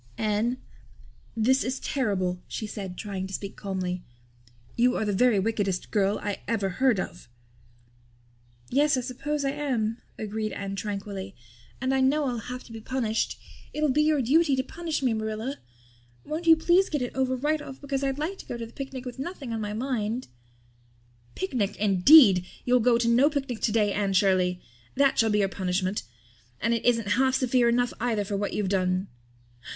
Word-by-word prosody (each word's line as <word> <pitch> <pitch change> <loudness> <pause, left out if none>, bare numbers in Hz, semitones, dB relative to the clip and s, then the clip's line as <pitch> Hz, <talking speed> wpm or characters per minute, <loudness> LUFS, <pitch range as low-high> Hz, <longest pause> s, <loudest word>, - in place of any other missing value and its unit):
"Anne, 220 +3 0 0.8
this 260 +5 +3
is 260 +1 -2
terrible," 185 -9 -1
she 220 - -4
said, 195 -4 -6
trying 195 -3 -4
to 190 - -10
speak 200 0 -6
calmly. 185 -2 -3 0.7
"You 245 +1 +3
are 220 - 0
the 205 - 0
very 240 +2 +4
wickedest 195 -2 -1
girl 205 -1 +2
I 205 -1 -2
ever 210 -4 0
heard 235 +3 +2
of." 175 -8 -6 1.4
"Yes, 285 +1 +3
I - - 0
suppose 280 +4 -3
I 275 - +1
am," 245 -6 -1 0.2
agreed 215 0 -3
Anne 195 0 -4
tranquilly. 195 -1 -5 0.4
"And 260 +1 0
I 265 - +2
know 285 +3 +3
I'll 245 -3 -1
have 250 +3 -7
to - - -15
be 225 -1 -8
punished. 225 -2 -1 0.3
It'll 300 -2 +1
be 300 +3 +3
your 300 -3 +2
duty 290 +3 +4
to 260 - 0
punish 320 +1 -4
me, 250 -3 +2
Marilla. 220 +5 -3 0.7
Won't 315 +3 -4
you 325 - +9
please 350 +4 +3
get 295 -4 -1
it 245 - -4
over 260 -1 +1
right 300 +4 0
off 270 -2 -9
because 275 -1 -3
I'd 270 0 0
like 330 +6 -3
to - - -11
go 240 - -4
to 230 - -5
the 225 - -14
picnic 270 -2 -6
with 250 +1 -7
nothing 275 -5 -5
on 225 - -2
my 210 -1 -3
mind." 235 0 -2 1.1
"Picnic, 200 +1 -1
indeed! 200 - +6 0.2
You'll 250 0 +4
go 240 0 +4
to 235 0 0
no 245 +5 +5
picnic 270 -6 -3
today, 210 -2 +2
Anne 200 -1 0
Shirley. 185 -2 +2 0.3
That 275 0 +3
shall 225 - +4
be 210 - +2
your - - -2
punishment. 185 +1 -1 0.6
And 230 +1 +1
it 230 - -1
isn't 230 -3 +2
half 265 0 +3
severe 250 -2 +3
enough 245 +1 +1
either 225 -3 0
for 200 - -3
what 200 +1 -2
you've 205 -3 -1
done!" 185 0 0
230 Hz, 185 wpm, -27 LUFS, 205-265 Hz, 1.4 s, you